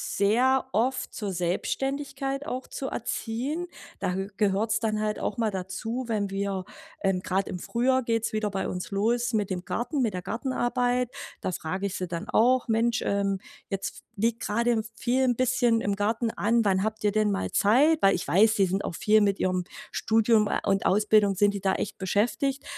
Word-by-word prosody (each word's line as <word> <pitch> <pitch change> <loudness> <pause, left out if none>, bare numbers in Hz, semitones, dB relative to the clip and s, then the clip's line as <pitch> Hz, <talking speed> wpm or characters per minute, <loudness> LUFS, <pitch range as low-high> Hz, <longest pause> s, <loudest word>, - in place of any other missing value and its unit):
sehr 250 +7 +3
oft 255 +4 0
zur 205 -3 -3
Selbstständigkeit 270 +10 -2
auch 255 +1 -4
zu 270 - -5
erziehen. 260 +8 -3 0.3
Da 180 - -1
gehö 195 +1 -3
gehört's 210 +2 +1
dann 215 -2 -1
halt 215 0 -1
auch 200 - -3
mal 225 -2 +1
dazu, 195 +7 -4
wenn 210 -3 -1
wir 195 -1 -2 0.4
ähm, 190 -2 +2
grade 190 +1 -1
im 180 - -4
Frühjahr 255 +6 +1
geht's 230 -1 0
wieder 215 -1 0
bei 195 -1 -2
uns 180 0 -4
los 235 +4 +1
mit 205 -3 0
dem 180 -1 -3
Garten, 240 - -2
mit 225 -5 +1
der 180 - -3
Gartenarbeit. 245 +1 0 0.3
Da - - -2
frage 185 +3 -3
ich 190 - -5
sie 185 - -3
dann 170 -1 -5
auch: 250 +2 +3
„Mensch, 225 +1 +2
ähm, 200 -1 0 0.3
jetzt 195 -1 -3
f - - -12 0.2
liegt 230 +3 +1
grade 235 +4 +1
in 225 -2 +1
viel 255 +4 +1
'n 245 -1 +2
bisschen 245 -2 +2
im 200 -2 0
Garten 225 +3 0
an, 230 +3 +1
wann 190 -2 +3
habt 220 0 -3
ihr 210 - +3
denn 215 0 +2
mal 195 - -2
Zeit?“ 275 +10 +4
Weil 195 0 +5
ich - - -3
weiß, 220 +5 +4
sie 195 - +4
sind 195 +2 -1
auch - - -4
viel 215 +4 +4
mit 200 -1 +2
ihrem 185 -1 0 0.3
Studium 220 -1 +3
äh, - - -1
und 195 0 +1
Ausbildung 210 0 +3
sind 205 +2 +3
die 200 - -3
da 190 -1 +1
echt 210 - -4
beschäftigt. 240 +8 0
215 Hz, 200 wpm, -27 LUFS, 195-240 Hz, 0.4 s, Weil